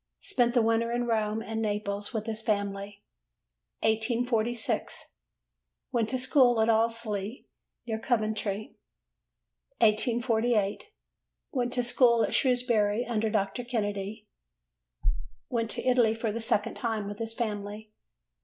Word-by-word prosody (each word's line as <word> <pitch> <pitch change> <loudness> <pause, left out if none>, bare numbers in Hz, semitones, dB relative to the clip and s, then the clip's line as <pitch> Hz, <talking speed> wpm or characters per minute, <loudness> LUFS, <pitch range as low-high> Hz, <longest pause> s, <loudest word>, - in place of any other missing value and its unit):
Spent 245 -11 +1
the 240 - +5
winter 230 +1 +2
in 240 0 0
Rome 220 -1 0
and 225 0 -3
Naples 205 -1 -2
with 220 -3 -3
his 220 -1 -4
family. 200 -1 -2 0.8
1846. 230 +1 0 0.8
Went 230 -4 +1
to 260 - +1
school 255 -2 +4
at 220 +1 +3
Allesley, 225 -1 0 0.4
near 220 -2 -2
Coventry. 215 -3 -1 1.0
1848. 230 - +2 0.6
Went 245 -3 -1
to 245 - +1
school 235 -1 +4
at - - -1
Shrewsbury 240 -4 +2
under 220 -2 0
Dr. 215 +3 -1
Kennedy. 210 -2 -3 1.2
Went 230 -2 -1
to - - -2
Italy 245 -3 +4
for 225 -1 -2
the 230 - -3
second 210 -2 0
time 220 -4 -2
with 205 0 -6
his 225 0 -3
family. 210 -1 -4
225 Hz, 120 wpm, -29 LUFS, 210-240 Hz, 1.2 s, the